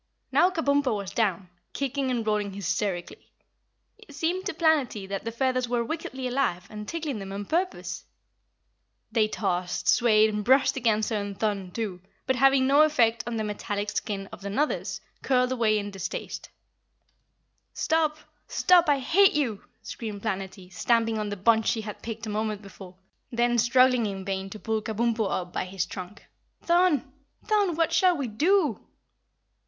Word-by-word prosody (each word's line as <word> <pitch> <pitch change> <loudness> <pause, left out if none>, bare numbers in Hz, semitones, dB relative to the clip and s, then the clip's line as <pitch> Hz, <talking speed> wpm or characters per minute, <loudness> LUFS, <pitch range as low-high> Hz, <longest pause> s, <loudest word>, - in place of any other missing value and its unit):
Now 360 - +5
Kabumpo 285 - +1
was 200 -2 -6
down, 195 -5 0 0.3
kicking 275 -1 -2
and 240 -3 -1
rolling 210 -2 0
hysterically. 190 -1 -3 0.7
It 430 -10 -14
seemed 345 +5 -1
to - - -2
Planetty 295 - +1
that 195 +2 -4
the 230 - -2
feathers 255 0 0
were 240 -1 +1
wickedly 265 -2 -4
alive 245 -9 -1
and 210 -1 -7
tickling 310 -8 -3
them 195 -1 -7
on 200 +1 -5
purpose. 360 - -2 1.1
They 220 -1 +3
tossed, 180 -4 -2
swayed 220 -3 +4
and 210 0 -2
brushed 260 +5 +4
against 225 -4 +1
her 220 - +1
and 200 -1 -5
Thun, 200 -4 -1
too, 190 -2 -4 0.2
but 260 - +1
having 270 +1 +4
no 280 +3 +5
effect 240 -7 +3
on 235 -1 -2
the 220 - -1
metalic 205 -1 -3
skin 200 -2 -3
of - - -10
the 200 - -5
Nuthers, 290 +10 -1 0.2
curled 250 -1 +2
away 225 -4 +2
in 205 0 -3
distaste. 190 -2 -6 1.3
"Stop! 315 -1 +1 0.3
Stop! 355 -3 +4
I 285 - +4
hate 385 +9 +4
you!" 245 -9 -1 0.2
screamed 210 -3 -6
Planetty, 190 -3 -5
stamping 225 +2 +1
on 210 -1 -2
the 205 - -4
bunch 225 +3 +3
she 225 - +1
had 210 -1 -8
picked 225 0 -6
a - - -5
moment 215 0 -2
before, 190 -2 -12 0.4
then 240 0 +2
struggling 250 0 +4
in 195 -1 -5
vain 195 -1 -3
to 215 - -8
pull 220 0 -2
Kabumpo 220 -1 0
up 180 -1 -3
by - - -2
his 185 -1 -2
trunk. 185 +2 -9 0.4
"Thun! 340 -6 +2 0.3
Thun! 410 -6 +2
What 330 0 +1
shall 355 +1 +4
we 280 - -2
do?" 305 - +2
225 Hz, 165 wpm, -26 LUFS, 205-275 Hz, 1.3 s, Now